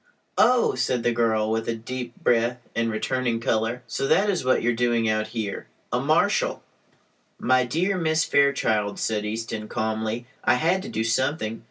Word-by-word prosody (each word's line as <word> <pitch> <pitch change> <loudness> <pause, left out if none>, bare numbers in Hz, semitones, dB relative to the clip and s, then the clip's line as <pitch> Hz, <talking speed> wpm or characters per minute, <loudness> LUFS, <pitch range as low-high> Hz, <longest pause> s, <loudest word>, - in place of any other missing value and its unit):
"Oh!" 250 -1 +4
said 125 -2 -1
the 120 - +2
girl, 110 -2 +1
with 110 0 -1
a 115 - 0
deep 120 +1 -6
breath 120 +1 +2 0.2
and 115 0 +1
returning 120 +1 -1
color. 115 +2 -1
"So 135 - -2
that 205 +6 +3
is 180 - -2
what 130 -2 +2
you 120 - +3
are - - -1
doing 120 -1 +1
out 110 0 0
here? 110 -2 -4 0.3
A - - +2
marshal!" - - +1 0.7
"My 130 0 +2
dear 180 +9 0
Miss 160 -1 +1
Fairchild," 110 -7 +2
said 105 -1 -1
Easton, 110 0 -4
calmly, 110 +1 -2 0.2
"I - - +4
had 170 +8 +1
to 215 - -7
do 165 - -2
something. 115 -1 -1
115 Hz, 175 wpm, -24 LUFS, 110-130 Hz, 0.7 s, Oh